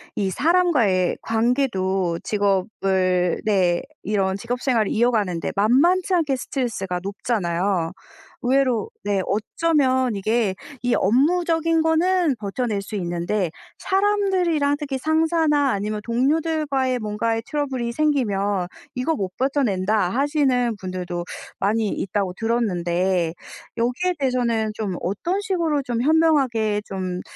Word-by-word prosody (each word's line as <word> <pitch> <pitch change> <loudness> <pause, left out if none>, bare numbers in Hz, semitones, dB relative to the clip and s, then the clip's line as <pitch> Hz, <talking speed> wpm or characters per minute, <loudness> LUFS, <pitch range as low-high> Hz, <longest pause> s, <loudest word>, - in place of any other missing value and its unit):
이 195 -2 0
사람과의 275 - +2
관계도 195 -7 0
직업을 190 -3 +1
네 185 -5 +2 0.2
이런 195 -2 0
직업 240 +3 -3
생활을 230 -6 +1
이어가는데 215 -7 +1
만만치 325 - +3
않게 310 -6 +2
스트레스가 225 -9 -3
높잖아요. 190 -4 -1 0.5
의외로 255 -4 +2 0.2
네 200 -2 +1
어쩌면 260 - +1
이게 215 0 +1 0.3
이 245 -1 +1
업무적인 325 - +2
거는 325 -1 +2
버텨낼 210 0 -2
수 210 - -7
있는데 175 +1 -1 0.3
사람들이랑 380 -7 +1
특히 285 -3 -3
상사나 315 -1 +2
아니면 210 +1 -2
동료들과의 270 +1 0
뭔가에 225 +2 -1
트러블이 265 -6 -2
생기면 205 -10 0 0.3
"이거 255 +6 0
못 195 -8 -2
버텨 275 +2 +1
낸다." 195 -3 +1
하시는 265 -2 +1
분들도 180 -2 -4 0.4
많이 215 +2 +1
있다고 195 -1 -2
들었는데 185 -6 0 0.4
여기에 250 +11 0
대해서는 235 -5 0
좀 200 -5 -3
어떤 335 - -1
식으로 335 -7 0
좀 240 -2 -2
현명하게 265 -9 +2
좀 185 -2 -4
235 Hz, 285 characters per minute, -22 LUFS, 195-290 Hz, 0.5 s, 만만치